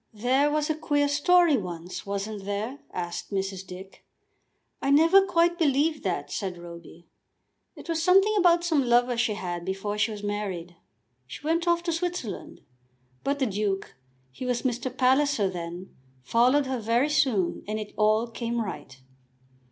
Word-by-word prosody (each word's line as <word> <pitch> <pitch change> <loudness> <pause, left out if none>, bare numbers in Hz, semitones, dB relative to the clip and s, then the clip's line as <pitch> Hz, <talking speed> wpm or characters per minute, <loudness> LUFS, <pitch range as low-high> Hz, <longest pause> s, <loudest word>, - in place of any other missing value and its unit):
"There 255 +7 +2
was 300 0 0
a 315 - +1
queer 290 -2 +1
story 310 +2 +4
once, 180 -2 -6
wasn't 200 0 -4
there?" 215 +7 -3
asked 175 -1 -5
Mrs. 195 -1 -3
Dick. 190 +1 -11 0.8
"I 275 - -1
never 330 +7 +6
quite 345 0 +2
believed 300 0 +2
that," 145 -6 -2
said 185 0 -3
Roby. 170 0 -12 0.7
"It - - -12
was 330 -1 -1
something 390 +5 +5
about 350 -3 +4
some 320 -5 +2
lover 245 0 +3
she 230 -3 0
had 175 -4 -4
before 195 +3 -3
she 210 - +2
was 210 -1 -7
married. 195 -4 -4 0.5
She 200 - -10
went 335 +2 0
off 340 0 +2
to 345 - -1
Switzerland. 340 - -4 0.6
But 280 +1 0
the 270 - +1
Duke, 200 -2 -2 0.4
he 130 - -9
was 250 -1 -1
Mr. 250 0 -1
Palliser 260 -4 +2
then, 175 +1 -7 0.3
followed 250 - +3
her 260 -1 -2
very 230 +6 +1
soon 230 - +1
and 215 +1 -2
it 210 -1 -7
all 215 +1 +3
came 235 0 -3
right." 160 - -6
235 Hz, 160 wpm, -26 LUFS, 195-295 Hz, 0.8 s, never